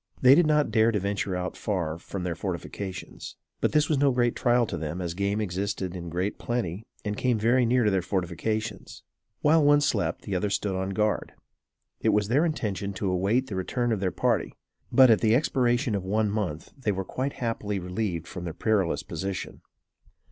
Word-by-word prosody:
They 130 Hz, +1 st, +7 dB
did 160 Hz, +2 st, +5 dB
not 150 Hz, -5 st, +2 dB
dare 110 Hz, +1 st, +4 dB
to 105 Hz, -, 0 dB
venture 100 Hz, -1 st, -2 dB
out 90 Hz, 0 st, -3 dB
far 85 Hz, -6 st, -2 dB
from 95 Hz, +2 st, -6 dB
their 90 Hz, -1 st, -1 dB
fortifications; 95 Hz, +1 st, -6 dB, 0.2 s
but, -, -, +1 dB
this 150 Hz, -1 st, +3 dB
was 150 Hz, -4 st, +1 dB
no 140 Hz, 0 st, +4 dB
great 120 Hz, -1 st, +1 dB
trial 120 Hz, 0 st, +3 dB
to 95 Hz, -, -4 dB
them, 80 Hz, +2 st, -4 dB
as 85 Hz, -2 st, -3 dB
game 100 Hz, +3 st, -1 dB
existed 95 Hz, -1 st, -2 dB
in 85 Hz, -1 st, -6 dB
great 90 Hz, +5 st, -2 dB
plenty 115 Hz, -3 st, -3 dB, 0.2 s
and 105 Hz, 0 st, -1 dB
came 125 Hz, +1 st, +1 dB
very 120 Hz, +3 st, +3 dB
near 120 Hz, -1 st, +3 dB
their 95 Hz, -1 st, +2 dB
fortifications. 95 Hz, +4 st, -3 dB, 0.4 s
While 155 Hz, +1 st, +4 dB
one 145 Hz, 0 st, +6 dB
slept, 145 Hz, -, 0 dB
the 100 Hz, -, -3 dB
other 100 Hz, +3 st, 0 dB
stood 100 Hz, 0 st, -1 dB
on 95 Hz, +1 st, -2 dB
guard. 105 Hz, +2 st, -1 dB, 0.7 s
It -, -, +1 dB
was 105 Hz, 0 st, +2 dB
their 145 Hz, +8 st, +3 dB
intention 100 Hz, -, -2 dB
to 95 Hz, 0 st, -2 dB
await 100 Hz, +8 st, +1 dB
the 105 Hz, -, -6 dB
return 120 Hz, +6 st, -1 dB
of 110 Hz, -, 0 dB
their 95 Hz, -1 st, 0 dB
party; -, -, 0 dB, 0.4 s
but, 130 Hz, -3 st, +7 dB
at 110 Hz, -, +4 dB
the 110 Hz, 0 st, +4 dB
expiration 125 Hz, -2 st, +1 dB
of 100 Hz, -2 st, -1 dB
one 105 Hz, +2 st, +1 dB
month, 95 Hz, -8 st, -3 dB
they 125 Hz, -6 st, -1 dB
were 95 Hz, -1 st, -3 dB
quite 135 Hz, +7 st, -3 dB
happily 110 Hz, -4 st, -2 dB
relieved 90 Hz, -2 st, -3 dB
from 90 Hz, -, -7 dB
their 85 Hz, -2 st, -5 dB
perilous 100 Hz, -3 st, +1 dB
position. 95 Hz, -3 st, -5 dB
105 Hz, 195 wpm, -27 LUFS, 95-120 Hz, 0.7 s, They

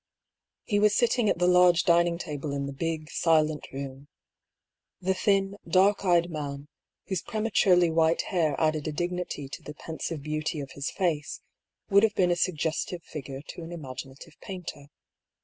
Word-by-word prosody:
He 205 Hz, -2 st, +1 dB
was 210 Hz, 0 st, +4 dB
sitting 240 Hz, -2 st, +3 dB
at -, -, +1 dB
the 180 Hz, -, +2 dB
large 180 Hz, -1 st, +5 dB
dining 170 Hz, 0 st, +3 dB
table 150 Hz, -4 st, -5 dB
in 140 Hz, 0 st, -2 dB
the 140 Hz, -, -5 dB
big, 155 Hz, +2 st, -3 dB
silent 155 Hz, -2 st, +2 dB
room. 135 Hz, 0 st, -7 dB, 0.9 s
The 190 Hz, +1 st, +1 dB
thin, 195 Hz, +1 st, +1 dB
dark 195 Hz, +2 st, +4 dB
eyed 175 Hz, -2 st, +3 dB
man, 145 Hz, -2 st, -5 dB, 0.4 s
whose 190 Hz, -4 st, -2 dB
prema 220 Hz, -1 st, -3 dB
turely 180 Hz, -4 st, +4 dB
white 165 Hz, 0 st, +3 dB
hair 165 Hz, -5 st, 0 dB
added 155 Hz, -2 st, +1 dB
a -, -, -1 dB
dignity 175 Hz, -2 st, -3 dB
to -, -, -8 dB
the 150 Hz, +2 st, -9 dB
pensive 160 Hz, -1 st, -5 dB
beauty 155 Hz, +1 st, -2 dB
of 140 Hz, -2 st, -6 dB
his 140 Hz, 0 st, -4 dB
face, 160 Hz, -5 st, -2 dB, 0.5 s
would 200 Hz, 0 st, +7 dB
have 215 Hz, -1 st, +2 dB
been 180 Hz, -1 st, +3 dB
a -, -, +3 dB
suggestive 170 Hz, 0 st, -1 dB
figure 140 Hz, -2 st, -7 dB
to -, -, -7 dB
an 165 Hz, +1 st, -8 dB
imaginative 135 Hz, -4 st, -8 dB
painter. 180 Hz, -7 st, -7 dB
165 Hz, 165 wpm, -27 LUFS, 150-180 Hz, 0.9 s, would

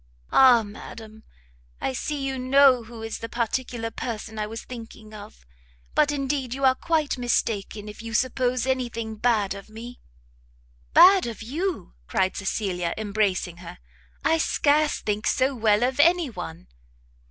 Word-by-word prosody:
"Ah 250 Hz, -4 st, +6 dB
madam! 215 Hz, +1 st, -11 dB, 0.6 s
I 265 Hz, -, -2 dB
see 290 Hz, +3 st, -3 dB
you 265 Hz, -1 st, -3 dB
know 255 Hz, -1 st, +5 dB
who 225 Hz, -1 st, -10 dB
is 225 Hz, -, -5 dB
the 230 Hz, -, -6 dB
particular 235 Hz, 0 st, -2 dB
person 220 Hz, -1 st, -5 dB
I 210 Hz, -, -2 dB
was 225 Hz, +1 st, -7 dB
thinking 225 Hz, -3 st, -10 dB
of! 210 Hz, -, -12 dB, 0.5 s
but 300 Hz, -1 st, +3 dB
indeed 275 Hz, -3 st, -2 dB
you 275 Hz, 0 st, 0 dB
are 260 Hz, -, +6 dB
quite 305 Hz, -1 st, -1 dB
mistaken 215 Hz, -3 st, -1 dB
if 210 Hz, +1 st, -9 dB
you 225 Hz, -1 st, -6 dB
suppose 255 Hz, 0 st, +1 dB
any 260 Hz, -2 st, 0 dB
thing 230 Hz, -1 st, -5 dB
bad 215 Hz, -4 st, +1 dB
of 200 Hz, +1 st, -11 dB
me!" 235 Hz, +3 st, -10 dB, 1.0 s
"Bad 375 Hz, -3 st, +7 dB
of 225 Hz, -1 st, -6 dB
you!" 315 Hz, -, -3 dB
cried 190 Hz, 0 st, 0 dB
Cecilia, 185 Hz, -3 st, -2 dB
embracing 200 Hz, -4 st, -1 dB
her, 175 Hz, 0 st, -10 dB, 0.5 s
"I 325 Hz, 0 st, +3 dB
scarce 300 Hz, -1 st, +2 dB
think 210 Hz, +1 st, -2 dB
so 265 Hz, +2 st, +2 dB
well 220 Hz, -2 st, +2 dB
of 260 Hz, +2 st, 0 dB
any 335 Hz, -2 st, +4 dB
one!" 80 Hz, -, -8 dB
230 Hz, 155 wpm, -25 LUFS, 215-265 Hz, 1.0 s, Bad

